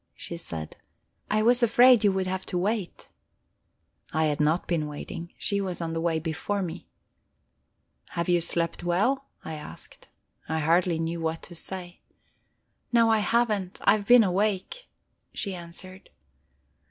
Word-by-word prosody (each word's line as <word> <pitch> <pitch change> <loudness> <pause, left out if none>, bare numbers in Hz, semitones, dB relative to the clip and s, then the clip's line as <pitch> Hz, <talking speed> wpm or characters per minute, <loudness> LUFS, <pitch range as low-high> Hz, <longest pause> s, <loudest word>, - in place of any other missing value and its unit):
she 170 - -6
said. 80 - -6 0.5
"I 215 +1 +2
was 240 +2 +6
afraid 240 0 +6
you 205 - +5
would 190 0 -1
have 185 0 -3
to 180 - -2
wait." 200 0 -2 1.0
I 160 +1 +1
had 150 -1 0
not 155 +4 +2
been 160 -4 0
waiting; 165 +3 -7
she 200 -1 0
was 185 -3 -3
on 165 -1 -3
the 165 - -2
way 165 -1 +1
before 175 +5 -2
me. 175 0 -6 1.3
"Have 170 0 -1
you 175 -1 +3
slept 170 0 0
well?" 210 +11 +1 0.2
I 160 - -5
asked. 150 -1 -9 0.4
I 160 - 0
hardly 170 +2 +2
knew 165 +1 -3
what 160 0 -2
to 175 - -10
say. 175 +1 -4 0.9
"No, 230 -2 +4
I 220 - +4
haven't. 210 -4 0
I - - +6
have 205 -1 0
been 245 -1 +8
awake," 200 - -1 0.5
she 200 - -2
answered. 180 +2 -7
180 Hz, 155 wpm, -27 LUFS, 165-205 Hz, 1.3 s, been